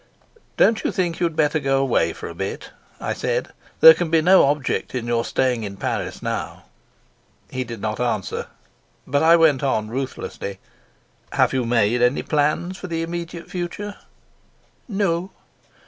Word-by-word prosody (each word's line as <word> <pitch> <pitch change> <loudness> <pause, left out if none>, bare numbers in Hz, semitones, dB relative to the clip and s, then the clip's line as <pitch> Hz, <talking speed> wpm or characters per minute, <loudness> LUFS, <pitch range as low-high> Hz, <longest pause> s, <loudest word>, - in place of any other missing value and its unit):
"Don't 225 - +4
you - - 0
think 175 -4 -1
you'd 170 -3 0
better 155 0 +2
go 135 -1 +1
away 135 -1 +2
for - - -8
a - - -7
bit?" - - -5 0.3
I - - -2
said. - - -2 0.3
"There 485 0 +11
can 170 - -2
be 165 0 +4
no 180 +2 +6
object 140 -2 -1
in 120 -2 -2
your 120 -1 0
staying 125 -3 0
in 100 -1 -6
Paris - - -3
now." - - -4 0.9
He 130 - -2
did 115 -3 -8
not 105 -1 -3
answer, 120 -5 -2 0.6
but 140 +2 +1
I 165 +1 +7
went 160 -5 +4
on 110 -6 0
ruthlessly: 120 -5 -5 0.8
"Have - - +3
you 130 -2 0
made 115 0 +2
any 125 +2 +2
plans 155 +5 0
for 185 - -6
the 165 -1 -2
immediate 170 0 -6
future?" 190 +3 -4 0.9
"No." 195 -4 -1
150 Hz, 160 wpm, -22 LUFS, 125-170 Hz, 0.9 s, There